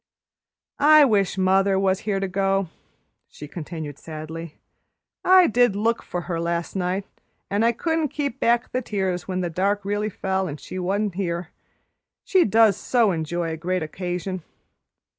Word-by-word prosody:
"I 300 +1 +7
wish 200 -6 +1
mother 190 +1 +3
was 190 0 +2
here 195 -1 +1
to 195 - -1
go," 195 -1 0 0.6
she 150 - -10
continued 155 -2 -7
sadly. 160 0 -8 0.7
"I 370 0 +7
did 245 - +3
look 225 +3 0
for 175 - -4
her 170 -1 -3
last 170 +1 -2
night, 190 +1 -1 0.5
and 205 +2 +1
I 230 - +4
couldn't 320 +6 -1
keep 280 -2 -4
back 235 0 +2
the 255 - -1
tears 190 -6 -2
when 185 -1 -2
the 175 - -2
dark 195 +4 0
really 205 +1 -1
fell 190 -1 -2
and 150 -2 -6
she 185 - -7
wa'n't 200 +2 -1
here, 175 -2 -3 0.7
she 375 -2 +3
does 220 -1 +4
so 235 -5 +2
enjoy 165 0 -2
a 160 - -4
great 180 +1 -1
occasion. 180 +3 -4
190 Hz, 160 wpm, -23 LUFS, 175-215 Hz, 0.7 s, I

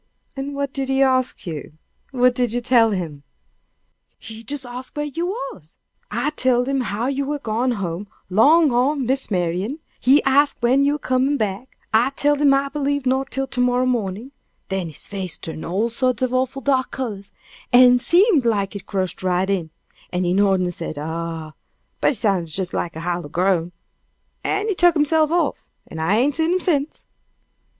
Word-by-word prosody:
"What 280 0 -4
did 270 -1 -3
he 270 0 +3
ask 255 -1 +1
you? 155 -4 -6 0.4
What 250 -2 +3
did 245 -2 0
you 245 - 0
tell 240 -2 +4
him?" 170 -8 -4 1.0
"He 225 0 -10
jes 285 -2 -2
ax 250 +1 -7
where 295 0 -2
you 330 +4 -3
was. 275 - -7 0.3
I 240 +8 -1
telled 255 -4 +2
him 275 -1 0
how 220 0 -2
you 275 +1 -1
were 295 +2 -2
gone 240 -1 -1
home 195 -2 -4 0.2
'long 290 - +5
o' 255 +5 +2
Miss 265 -1 -1
Marian; 185 - -1 0.2
he 270 +4 +4
ax 280 +2 +3
when 250 +3 +3
you 285 +1 +3
were - - -1
comin' 265 +1 +1
back; 215 +2 -4 0.2
I 235 +4 +4
telled 290 0 +2
him 285 -1 +5
I 275 0 +2
believed 285 -1 -1
not 265 +1 0
till 270 0 -2
to 255 -1 -2
morrow 250 0 +2
mornin'; 230 0 -2 0.4
then 190 -3 -2
his 155 - -9
face 190 -4 -4
turned 160 -1 -7
all 195 +7 0
sorts 255 0 0
of 255 -1 0
awful 260 +1 -1
dark 260 0 +1
colors, 210 -6 -5 0.4
an' 250 0 +7
seemed 345 - +4
like 205 -4 0
it 200 - -8
crushed 190 -3 -2
right 185 0 +1
in, 175 -5 -1 0.4
an' 180 0 -1
he 175 0 +1
nodded 195 -1 +3
and 175 0 -2
said 155 - -5
'Ah!' 160 +1 -5 0.5
but - - +2
it - - -5
sounded 190 -8 0
jes 185 -2 -1
like 170 - -3
a 160 - -6
hollow 175 -2 -3
groan; 175 0 +1 0.7
and 410 +2 -1
he 425 - +1
tuk 350 -2 +4
hisself 305 +1 +3
off, 345 +1 0 0.2
and 160 - -7
I 175 +6 +2
ain't 270 +5 +1
seen 325 +2 +2
him 370 - +1
sence." 305 -5 -1
245 Hz, 190 wpm, -21 LUFS, 190-275 Hz, 1.0 s, an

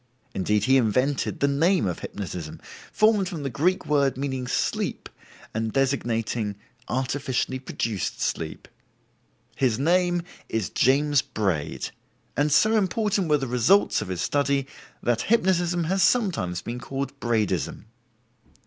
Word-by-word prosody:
Indeed 105 +2 +1
he 130 +4 +5
invented 130 +4 +1
the 140 - +4
name 165 - +2
of 90 -3 -2
hypnotism, 90 -5 -6 0.3
formed 215 -3 +3
from 165 -6 -5
the 135 - -3
Greek 175 +10 +1
word 140 -3 +2
meaning 130 -2 -3
'sleep', 125 - -1 0.5
and 110 0 -1
designating 115 -5 0 0.3
'artificially 130 0 -1
produced 115 -6 -3
sleep'. - - -3 0.9
His 125 -5 +1
name 175 +4 +2 0.3
is 110 -4 -2
James 145 +2 +3
Braid, 100 - -2 0.4
and 150 +1 +1
so 220 +9 +4
important 205 -2 0
were 150 - +5
the 135 - -3
results 125 - +3
of - - -5
his 90 -1 -3
study 140 +1 +1 0.4
that 120 -2 +1
hypnotism 175 -5 +2
has 190 +4 0
sometimes 170 - +1
been 120 +1 -5
called 135 +2 -5
"Braidism". 110 - -1
135 Hz, 130 wpm, -25 LUFS, 115-170 Hz, 0.9 s, he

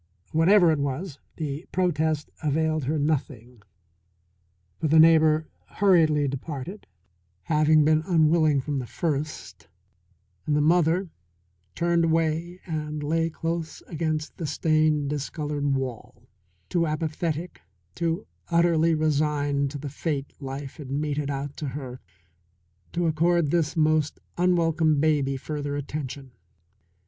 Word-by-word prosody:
Whatever 175 +2 +5
it 155 - 0
was, 140 +2 -3 0.2
this 150 0 -4
protest 160 -4 0
availed 155 -1 0
her 155 +4 0
nothing, 130 -6 -2 1.2
for 160 - 0
the 160 +2 +4
neighbour 160 -1 +5 0.3
hurriedly 160 -7 +4
departed, 140 +7 -6 0.6
having 155 - +4
been 155 0 +4
unwilling 155 -4 +3
from 145 0 -2
the 125 - -5
first, 150 +4 -4 0.8
and 150 - +2
the - - +3
mother 170 +3 +2 0.6
turned 170 0 +2
away 165 +2 0
and 150 -2 -4
lay 165 +2 +1
close 165 0 -4
against 155 -1 -3
the 165 - -3
stained, 155 -1 +1
discoloured 145 -1 -2
wall, 125 -2 -5 0.4
too 170 - +1
apathetic, 160 +2 -3 0.3
too 170 +2 -2 0.2
utterly 170 -1 +3
resigned 145 -2 +1
to 145 - -6
the 145 +1 -6
fate 145 0 -3
life 135 0 -6
had 145 -5 -9
meted 145 0 -2
out 140 0 -4
to 150 - -4
her 130 -2 -6 0.9
to 175 0 -1
accord 165 0 +2
this 165 -2 0
most 155 -1 +2 0.2
unwelcome 165 -4 +2
baby 140 -3 +1
further 145 +1 -4
attention. 140 -2 -5
155 Hz, 120 wpm, -25 LUFS, 145-165 Hz, 1.2 s, Whatever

